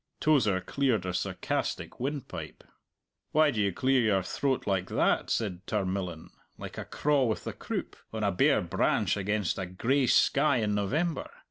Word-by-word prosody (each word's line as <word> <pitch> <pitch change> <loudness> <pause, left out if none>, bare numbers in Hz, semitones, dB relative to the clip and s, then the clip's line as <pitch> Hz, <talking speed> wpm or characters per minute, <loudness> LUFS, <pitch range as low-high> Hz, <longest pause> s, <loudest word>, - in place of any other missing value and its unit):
Tozer 110 -12 +3
cleared 120 0 0
a 90 - -2
sarcastic - - -3
windpipe. 130 - -5 0.7
"Why 155 -1 +5
do 110 - -1
you 100 -1 +2
clear 130 +7 +2
your 100 -4 +2
throat 135 +7 -1
like 95 -2 0
that?" - - +1
said 95 -6 -1
Tarmillan 95 -5 -3 0.3
"like - - -7
a - - -5
craw 145 -3 +1
with 110 -2 -1
the - - -4
croup, - - -5 0.2
on 110 -1 -3
a 100 - +2
bare 90 - +3
branch - - +1
against 105 -1 -1
a 95 - -3
gray 125 +9 +1
sky 145 +4 +4
in 105 -3 0
November! 145 - -1
105 Hz, 160 wpm, -29 LUFS, 95-135 Hz, 0.7 s, Why